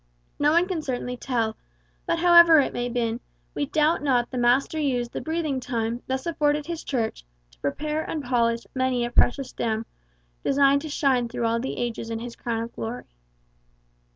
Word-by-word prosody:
No 290 Hz, +1 st, +4 dB
one 340 Hz, +3 st, +3 dB
can 360 Hz, -4 st, -2 dB
certainly 250 Hz, -3 st, -3 dB
tell; 230 Hz, -3 st, -1 dB, 0.5 s
but 335 Hz, -, +1 dB
however 340 Hz, -2 st, +7 dB
it 275 Hz, -, +1 dB
may 245 Hz, -, -2 dB
have 245 Hz, -, -4 dB
been, 230 Hz, -1 st, 0 dB, 0.3 s
we 285 Hz, -, -2 dB
doubt 305 Hz, +2 st, +2 dB
not 250 Hz, -4 st, +1 dB
the 255 Hz, -, -4 dB
Master 250 Hz, +6 st, +2 dB
used 250 Hz, -5 st, -1 dB
the -, -, -4 dB
breathing 315 Hz, -4 st, -2 dB
time 235 Hz, -1 st, -2 dB
thus 265 Hz, 0 st, -2 dB
afforded 300 Hz, -3 st, +1 dB
his 335 Hz, 0 st, -5 dB
Church 230 Hz, -, -2 dB, 0.3 s
to -, -, -25 dB
prepare 300 Hz, -, -2 dB
and 305 Hz, -3 st, -3 dB
polish 235 Hz, -2 st, +1 dB
many 255 Hz, -2 st, 0 dB
a 240 Hz, -, -5 dB
precious 255 Hz, +2 st, +2 dB
gem, 225 Hz, -1 st, -2 dB, 0.6 s
destined 280 Hz, 0 st, +4 dB
to 310 Hz, -, -6 dB
shine 260 Hz, -5 st, +1 dB
through 240 Hz, 0 st, -2 dB
all 230 Hz, 0 st, +1 dB
ages 240 Hz, -3 st, -3 dB
in 225 Hz, -, -2 dB
his 235 Hz, +1 st, -7 dB
crown 230 Hz, -1 st, -3 dB
of 230 Hz, -, -8 dB
glory. 230 Hz, +2 st, -5 dB
255 Hz, 180 wpm, -25 LUFS, 235-295 Hz, 0.6 s, however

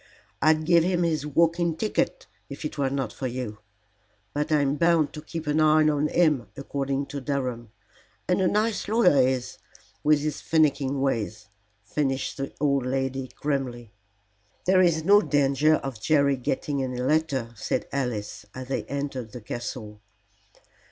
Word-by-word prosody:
I'd 155 Hz, 0 st, +3 dB
give 170 Hz, 0 st, +5 dB
him 175 Hz, 0 st, +1 dB
his 155 Hz, -3 st, 0 dB
walking 165 Hz, +2 st, +2 dB
ticket 210 Hz, +6 st, -1 dB, 0.2 s
if 140 Hz, +3 st, -7 dB
it 150 Hz, -, -4 dB
were 140 Hz, -2 st, 0 dB
not 135 Hz, -5 st, -2 dB
for 130 Hz, -, -4 dB
you. 120 Hz, -4 st, -5 dB, 0.7 s
But 150 Hz, +2 st, -2 dB
I'm 145 Hz, -2 st, +2 dB
bound 165 Hz, -1 st, +2 dB
to 150 Hz, -, -7 dB
keep 165 Hz, +1 st, -6 dB
an 150 Hz, +1 st, +1 dB
eye 155 Hz, 0 st, +5 dB
on 150 Hz, 0 st, +2 dB
him, 150 Hz, -8 st, +2 dB
according 140 Hz, 0 st, -2 dB
to 140 Hz, 0 st, -6 dB
Durham. 125 Hz, -5 st, -3 dB, 0.6 s
And 180 Hz, +1 st, +2 dB
a 185 Hz, -, +3 dB
nice 215 Hz, +3 st, 0 dB
lawyer 205 Hz, -, +4 dB
he 130 Hz, +1 st, +3 dB
is, 125 Hz, -1 st, -6 dB, 0.4 s
with 150 Hz, -1 st, +4 dB
his 150 Hz, -1 st, -3 dB
finiking 140 Hz, -4 st, +1 dB
ways," 110 Hz, -5 st, -2 dB, 0.4 s
finished 135 Hz, +2 st, -1 dB
the 135 Hz, -1 st, -4 dB
old 140 Hz, -2 st, +2 dB
lady 135 Hz, 0 st, -2 dB
grimly. 125 Hz, -6 st, -3 dB, 0.7 s
"There 185 Hz, 0 st, +5 dB
is 165 Hz, -3 st, +3 dB
no 205 Hz, +4 st, +6 dB
danger 145 Hz, -1 st, +3 dB
of 130 Hz, -7 st, -5 dB
Jerry 140 Hz, 0 st, +3 dB
getting 135 Hz, +2 st, -2 dB
any 125 Hz, -1 st, -3 dB
letter," 130 Hz, -3 st, 0 dB
said -, -, -2 dB
Alice, 125 Hz, -7 st, -3 dB
as 130 Hz, 0 st, -7 dB
they 135 Hz, -, -2 dB
entered 135 Hz, -4 st, -4 dB
the 125 Hz, -, -7 dB
castle. 110 Hz, -2 st, -6 dB
140 Hz, 160 wpm, -26 LUFS, 130-155 Hz, 0.7 s, no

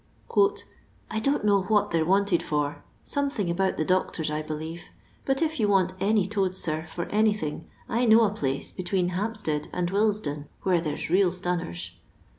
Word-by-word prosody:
" -, -, -14 dB, 0.7 s
I 220 Hz, -, -1 dB
don't 275 Hz, -2 st, +1 dB
know 200 Hz, -2 st, +4 dB
what 205 Hz, +2 st, +1 dB
they 165 Hz, -1 st, +2 dB
're -, -, +1 dB
wanted 195 Hz, 0 st, +3 dB
for, 145 Hz, -1 st, -2 dB, 0.2 s
something 275 Hz, -11 st, -1 dB
about 190 Hz, +2 st, 0 dB
the 155 Hz, -, 0 dB
doctors, 180 Hz, -3 st, 0 dB
I 150 Hz, 0 st, -1 dB
believe. 155 Hz, +2 st, -6 dB, 0.4 s
But 270 Hz, +3 st, +1 dB
if 315 Hz, -1 st, -1 dB
you 215 Hz, -, +3 dB
want 190 Hz, -2 st, +3 dB
any 205 Hz, 0 st, +2 dB
toads, 190 Hz, -2 st, -1 dB
sir, 155 Hz, -2 st, -1 dB
for 170 Hz, +2 st, -4 dB
an3rthiog, 210 Hz, -7 st, 0 dB, 0.2 s
I 240 Hz, +2 st, +1 dB
know 225 Hz, 0 st, +7 dB
a 210 Hz, -, +2 dB
pUoe 140 Hz, -10 st, -3 dB
between 185 Hz, -1 st, 0 dB
Hampstead 180 Hz, -6 st, -2 dB
and 175 Hz, 0 st, -1 dB
Willesden, 200 Hz, -8 st, 0 dB, 0.2 s
where 180 Hz, -3 st, +2 dB
there 150 Hz, -3 st, -3 dB
's -, -, -4 dB
real 185 Hz, 0 st, +4 dB
stunners." 175 Hz, -, -3 dB
185 Hz, 180 wpm, -26 LUFS, 160-210 Hz, 0.7 s, know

